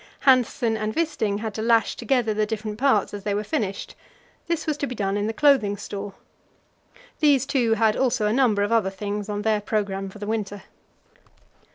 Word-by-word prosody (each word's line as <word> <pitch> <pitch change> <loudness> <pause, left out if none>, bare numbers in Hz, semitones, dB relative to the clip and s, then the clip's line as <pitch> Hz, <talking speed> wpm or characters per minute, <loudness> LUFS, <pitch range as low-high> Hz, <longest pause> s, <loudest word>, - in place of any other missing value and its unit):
Hanssen 250 -3 +3
and 215 0 -3
Wisting 220 -11 -1
had 220 -2 -4
to 220 - -4
lash 230 -1 +2
together 235 -2 0
the 210 0 0
different 215 -1 -4
parts 255 -8 +2
as 205 -1 -6
they 205 -1 -1
were 210 - -1
finished; 200 -2 -3 0.5
this 335 -2 -1
was 305 - 0
to 285 - -2
be 250 - -6
done 195 -2 -1
in 205 +1 -1
the - - 0
Clothing 225 -5 +3
Store. 200 0 -7 1.0
These 285 -4 +4
two 240 -5 +1
had 220 -1 +2
also 250 -4 +1
a 210 - +1
number 230 -6 +3
of 205 - -1
other 225 -4 +3
things 205 +1 -5
on 205 0 -3
their 215 -1 +1
programme 200 -2 -2
for 190 - -12
the 205 - -6
winter. 205 -2 -3
215 Hz, 195 wpm, -24 LUFS, 205-240 Hz, 1.0 s, These